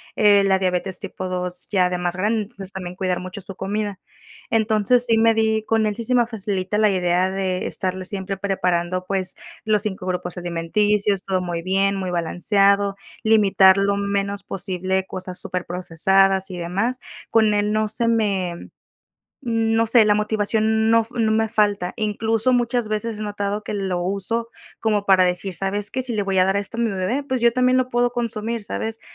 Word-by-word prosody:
eh, 205 -1 +5
la 190 -1 +3
diabetes 185 0 0
tipo 185 -1 -6
2 180 0 -3
ya 185 -3 +2
de 180 - -2
más 175 0 -2
grande, 215 +4 0
entonces 195 -3 -7
también 180 -2 -7
cuidar 185 -1 -1
mucho 185 +2 -8
su 195 0 -8
comida. 205 +1 -3 0.5
Entonces, 220 +2 +3
sí 225 -2 +3
me 225 0 +4
di, 220 -1 +1
con 225 -1 +1
él 210 - -2
sí 230 - -5
se 250 +3 +1
me 240 -1 +4
facilita 205 -3 -3
la 215 0 +4
idea 180 0 +1
de 190 -1 -2
estarle 185 -1 -3
siempre 195 -1 -4
preparando, 185 -2 -1
pues, 190 -1 -1 0.3
los 215 -2 +2
5 190 -3 -4
grupos 180 -1 -3
alimenticios, 195 +4 0
todo 185 -1 0
muy 175 -2 -3
bien, 195 +2 +1
muy 190 -2 -3
balanceado, 195 +4 +2 0.3
limitar 200 -3 +5
lo 200 0 +1
menos 200 0 -2
posible 190 -1 -1
cosas 185 -1 -6
super 180 -1 -4
procesadas 190 +2 +1
y 180 - -6
demás. 200 +9 -2 0.3
Con 220 -2 +4
él 210 0 +1
no 215 0 +1
se 225 +2 0
me, 195 -6 -1 0.8
no 225 0 +2
sé, 225 0 +5
la 210 0 +4
motivación 220 +1 +1
no 230 0 +5
f 225 - -10
no 220 -1 +2
me 220 0 +2
falta. 205 -4 +1
Incluso, 220 +2 0
muchas 240 -1 +1
veces 215 +1 -3
he - - -5
notado 205 0 -3
que - - -5
lo 190 -3 -2
uso 200 +5 -2 0.3
como 210 -2 0
para 190 -2 +5
decir, 180 +1 -1
¿sabes 195 +3 -1
qué? 260 - -2
Si 250 -3 -3
le 205 - 0
voy 195 -1 0
a 185 - +5
dar 195 +1 +1
esto 200 +3 -4
a - - -2
mi 230 - +1
bebé, 195 +8 -1
pues 260 -3 -2
yo 235 -1 +4
también 255 0 +3
lo 255 -1 0
puedo 245 0 +1
consumir. 230 -1 -3
¿Sabes? 225 +2 -4
200 Hz, 190 wpm, -22 LUFS, 185-220 Hz, 0.8 s, eh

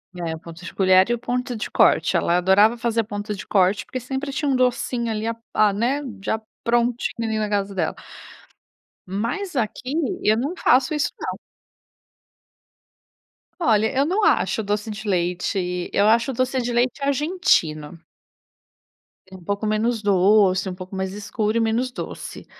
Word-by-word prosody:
É, 170 -2 -3
o - - -10
ponto 170 +1 -12
de - - -8
colher 185 +1 +4
e - - +2
o 240 - -2
ponto 245 +1 -3
de 215 - -4
corte. - - +3
Ela 175 - +2
adorava 205 +6 +4
fazer 230 -1 0
ponto 205 0 -5
de 195 - -8
corte, 190 0 +2
porque 255 - -5
sempre 265 +3 -4
tinha 290 +1 -1
um 270 - +2
docinho 245 -2 0
ali 215 0 -2
a 230 - -1 0.2
a 210 -2 +3
né? 245 +8 0 0.2
Já 220 +2 -1 0.2
prontinho 235 -1 0
ali 220 0 -1
na 215 -1 -1
casa 200 -1 -1
dela. 165 -4 -1 1.1
Mas, 240 - -3
aqui, 250 +3 -2 0.3
eu 215 - +3
não 280 +8 -2
faço 265 +3 +3
isso 295 -1 -1
não. - - -5 2.2
Olha, 220 -7 +3
eu 275 - +4
não 385 +7 0
acho 405 - +2
doce 210 +1 -2
de 215 +1 -7
leite. 180 0 -1
Eu 205 - +3
acho 230 +5 +3
doce 255 +1 0
de 240 0 -2
leite 245 +4 0
argentino. 275 - 0 1.3
É - - -10
um 180 - -13
pouco 200 +4 -2
menos 220 +2 0
doce, 195 -1 +3
um 180 - -6
pouco 185 +1 -9
mais 190 0 -2
escuro 210 +2 -2
e - - +3
menos 230 +3 0
doce. - - -7
220 Hz, 165 wpm, -22 LUFS, 195-245 Hz, 2.2 s, colher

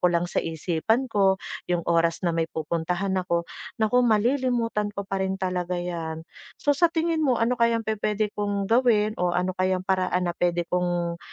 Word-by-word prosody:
ko 180 - +4
lang 175 0 +1
sa - - 0
isipan 180 - -1
ko 195 -2 +3 0.3
'yong 175 -1 0
oras 165 0 +2
na 170 - +3
may 165 -1 +1
pupuntahan 170 +4 -2
ako, 170 -1 0 0.4
naku, 220 +3 +3
malilimutan 230 -2 +1
ko 200 - -3
pa 195 0 -2
rin 190 0 -1
talaga 180 -1 -2
'yan. 165 -2 -4 0.4
So 290 - +3
sa 315 +5 +4
tingin 330 -1 0
mo, 255 - +3
ano 245 +1 +1
kayang 230 -1 +2
pupuwede 215 -1 -1
kong 205 0 -1
gawin 225 -3 +3
o 175 -1 0
ano 180 +1 +1
kayang 185 0 +1
paraan 185 -2 +1
na - - -3
puwede 175 -1 +1
kong, 175 -1 -1
190 Hz, 180 wpm, -25 LUFS, 175-220 Hz, 0.4 s, ko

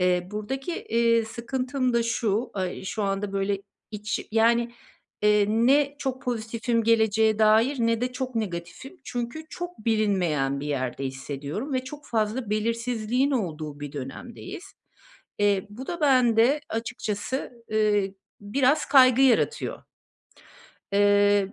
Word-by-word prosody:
Eee, 180 0 +1
buradaki, 265 +9 -4
eee, 235 - +2
sıkıntım 250 +3 -2
da 235 - +3
şu, 230 0 0
aaa, 185 -1 -3
şu 215 +2 -3
anda, 195 0 -1
böyle, 195 0 0 0.3
iç 210 0 -4
yani, 235 +1 +3 0.5
eee, 210 0 +5
ne 275 +6 +3
çok 265 -2 -3
pozitifim 230 -1 -1
geleceğe 220 -1 +3
dair 220 +6 +4
ne 230 0 +2
de 250 0 -1
çok 255 -1 -4
negatifim. 210 - -5
Çünkü 245 +6 -5
çok 350 -10 -7
bilinmeyen 180 -11 +1
bir 145 - -5
yerde 135 -2 -2
hissediyorum 140 - -5
ve 255 0 -1
çok 295 +2 -9
fazla 220 +1 -1
belirsizliğin 230 +4 0
olduğu 155 - -3
bir 145 0 -6
dönemdeyiz. 240 - -8 0.7
Eee, 205 -2 +2
bu 250 +6 -8
da 345 -1 -4
bende 255 -1 +4
açıkçası, 225 +2 -3 0.2
ııı, 210 -2 +2 0.3
biraz 260 +8 +2
kaygı 260 -2 +6
yaratıyor. 270 - +2 1.1
Eee, 205 0 +4
225 Hz, 125 wpm, -26 LUFS, 205-255 Hz, 1.1 s, kaygı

